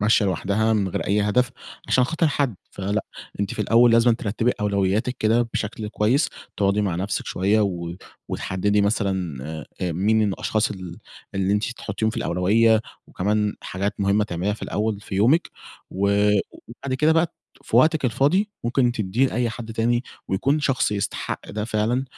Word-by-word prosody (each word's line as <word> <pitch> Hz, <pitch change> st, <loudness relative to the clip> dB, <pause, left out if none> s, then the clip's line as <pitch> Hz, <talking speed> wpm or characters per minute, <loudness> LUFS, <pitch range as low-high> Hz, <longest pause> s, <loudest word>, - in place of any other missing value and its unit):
ماشية 105 Hz, 0 st, +3 dB
لوحدها 100 Hz, +4 st, +1 dB
من 100 Hz, -3 st, +1 dB
غير -, -, -3 dB
أي 105 Hz, +2 st, +2 dB
هدف 125 Hz, +4 st, +2 dB, 0.4 s
عشان 125 Hz, -, +4 dB
خاطر 165 Hz, +2 st, +1 dB
حد، 140 Hz, -8 st, 0 dB
فلأ، 100 Hz, +2 st, -2 dB, 0.4 s
أنتِ 100 Hz, -, -2 dB
في 105 Hz, -, -1 dB
الأول 115 Hz, +3 st, +5 dB
لازمًا 115 Hz, +1 st, +5 dB
ترتّبي 115 Hz, +2 st, 0 dB
أولويّاتِك 100 Hz, +4 st, 0 dB
كده 115 Hz, +2 st, +3 dB
بشكل 105 Hz, 0 st, -3 dB
كويّس، 110 Hz, +8 st, +2 dB, 0.3 s
تقعُدي 100 Hz, +1 st, +2 dB
مع 95 Hz, -4 st, 0 dB
نفسِك 95 Hz, +4 st, -2 dB
شويّة 100 Hz, +4 st, +1 dB
و 85 Hz, -4 st, -2 dB, 0.3 s
وتحدّدي 100 Hz, +2 st, 0 dB
مثلًا 95 Hz, -, 0 dB, 0.4 s
آآ 90 Hz, -2 st, -1 dB
مين 105 Hz, +6 st, +2 dB
من 105 Hz, -3 st, +2 dB
الأشخاص 110 Hz, +2 st, 0 dB
ال 90 Hz, -3 st, -7 dB, 0.4 s
اللي 95 Hz, 0 st, +1 dB
أنتِ 105 Hz, +1 st, +1 dB
تحُطّيهم 110 Hz, -2 st, -2 dB
في -, -, -8 dB
الأولويّة 110 Hz, +5 st, +3 dB, 0.3 s
وكمان 105 Hz, +2 st, 0 dB
حاجات 100 Hz, +3 st, -3 dB
مُهمة 100 Hz, +1 st, +2 dB
تعمليها 90 Hz, +1 st, -2 dB
في -, -, -14 dB
الأول 105 Hz, 0 st, -1 dB
في 105 Hz, -, -7 dB
يومِك 125 Hz, -, +3 dB, 0.4 s
و 100 Hz, +2 st, 0 dB, 0.6 s
وبعد 130 Hz, +3 st, -5 dB
كده 150 Hz, +4 st, +3 dB
بقى 165 Hz, +1 st, +3 dB
ت -, -, -33 dB, 0.3 s
في -, -, -1 dB
وقتِك 155 Hz, -3 st, +4 dB
الفاضي، 160 Hz, -, +2 dB
ممكن 120 Hz, 0 st, +2 dB
تدّية 110 Hz, +3 st, +1 dB
لأي 120 Hz, -2 st, -1 dB
حد 115 Hz, 0 st, -7 dB
تاني 120 Hz, +2 st, +1 dB, 0.3 s
ويكون 140 Hz, +10 st, +1 dB
شخص 135 Hz, -6 st, +1 dB
يستحق 100 Hz, -1 st, -3 dB
ده 105 Hz, 0 st, -3 dB
فعلًا 115 Hz, +4 st, 0 dB
105 Hz, 170 wpm, -23 LUFS, 100-120 Hz, 0.6 s, الأول